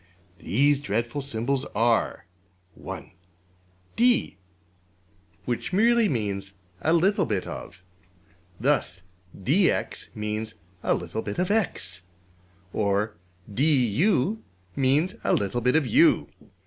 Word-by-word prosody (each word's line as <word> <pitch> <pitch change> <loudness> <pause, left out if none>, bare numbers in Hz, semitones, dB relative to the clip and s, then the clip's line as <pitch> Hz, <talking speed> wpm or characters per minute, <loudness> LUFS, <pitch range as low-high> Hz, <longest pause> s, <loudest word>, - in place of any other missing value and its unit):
These 140 - +2
dreadful 120 +4 -2
symbols 135 +1 -1
are: 115 -1 +1 0.5
(1) - - -8 0.8
$d$ 240 - +3 1.1
which 125 +10 -2
merely 230 +2 +4
means 100 - -2 0.3
``a 165 +2 +4
little 195 -1 +2
bit 100 -5 -1
of.'' 90 - -8 0.8
Thus 115 -8 0 0.4
$dx$ 165 - +1
means 110 +1 -3 0.3
a - - +2
little 90 +6 -4
bit 100 -1 -5
of~$x$; 180 - 0 0.7
or 105 +1 0 0.3
$du$ 140 - +2 0.4
means 140 +7 +2
a - - +2
little 100 +4 0
bit 125 +3 +2
of~$u$. 260 - +4
125 Hz, 95 wpm, -26 LUFS, 105-170 Hz, 1.1 s, merely